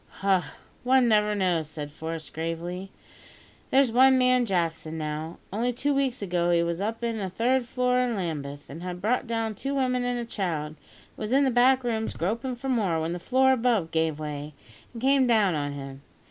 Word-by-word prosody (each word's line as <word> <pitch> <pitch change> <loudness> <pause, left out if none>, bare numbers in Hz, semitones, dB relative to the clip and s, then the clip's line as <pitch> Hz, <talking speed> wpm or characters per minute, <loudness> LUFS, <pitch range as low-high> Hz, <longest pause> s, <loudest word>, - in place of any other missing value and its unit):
"Ah! 190 -6 +1 0.3
one 255 0 +4
never 210 -1 +3
knows," 175 -6 0
said 150 -2 -6
Forest 160 0 -6
gravely. 170 +4 -4 0.8
"There's 265 -2 +4
one 260 +2 +6
man 250 -1 +3
Jackson, 165 -4 -1
now, 155 +1 -4 0.2
only 235 +4 0
two 280 +4 0
weeks 265 -5 0
ago 175 -2 0
he 170 -1 +3
was 170 +1 -2
up 225 +3 -3
in 230 -2 -1
a 190 -2 -3
third 245 +6 +1
floor 250 0 +1
in 250 -2 0
Lambeth, 145 -6 -4
and 160 +4 -9
had 180 0 -5
brought 240 +6 0
down 225 -1 -1
two 275 +7 -4
women 255 -2 +1
and 245 0 -1
a 240 - -3
child, 170 -9 -2
and 155 - -15 0.4
was 215 +1 -4
in 275 +2 +4
the 265 - +2
back 255 +2 +4
rooms 225 -2 -2
groping 230 +9 -2
for 245 +3 -7
more, 205 -11 +1
when 160 +2 -2
the 175 - -4
floor 260 +7 +3
above 230 -9 +1
gave 160 -2 0
way 150 -1 -6 0.4
and 235 0 -9
came 270 -1 +4
down 215 -6 +3
on 145 -2 -2
him. 135 -1 -8
210 Hz, 200 wpm, -26 LUFS, 165-250 Hz, 0.8 s, one